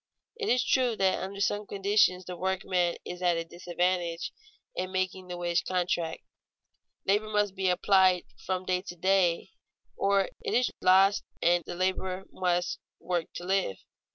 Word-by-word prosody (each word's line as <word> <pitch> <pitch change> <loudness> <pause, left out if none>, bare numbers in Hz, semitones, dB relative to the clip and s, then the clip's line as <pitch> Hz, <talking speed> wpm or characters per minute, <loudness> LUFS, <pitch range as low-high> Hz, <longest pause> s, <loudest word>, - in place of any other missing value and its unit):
It 445 -3 -3
is 250 0 +3
true 250 -3 +2
that 190 -2 +1
under 195 +1 -5
some 205 +1 0
conditions 195 -2 +2
the 180 - -6
workman 185 -1 0
is 180 0 -7
at 175 -2 +2
a 165 - -3
disadvantage 175 0 -1 0.4
in 185 0 -3
making 185 0 -2
the 180 -1 -5
wage 175 0 0
contract; 175 -3 -1 0.8
labor 210 +2 +2
must 210 -2 +1
be 190 -1 0
applied 185 0 +4 0.2
from 185 0 -2
day 180 -1 0
to 180 -2 -8
day 185 0 +2 0.4
or 195 -1 +2
it - - -1
is 250 +1 +2
lost, 190 +2 +5 0.2
and 175 0 +4
the - - -6
laborer 185 +1 -1
must 180 -1 0 0.2
work 175 -2 -2
to - - -6
live. 190 - 0
185 Hz, 155 wpm, -29 LUFS, 175-195 Hz, 0.8 s, lost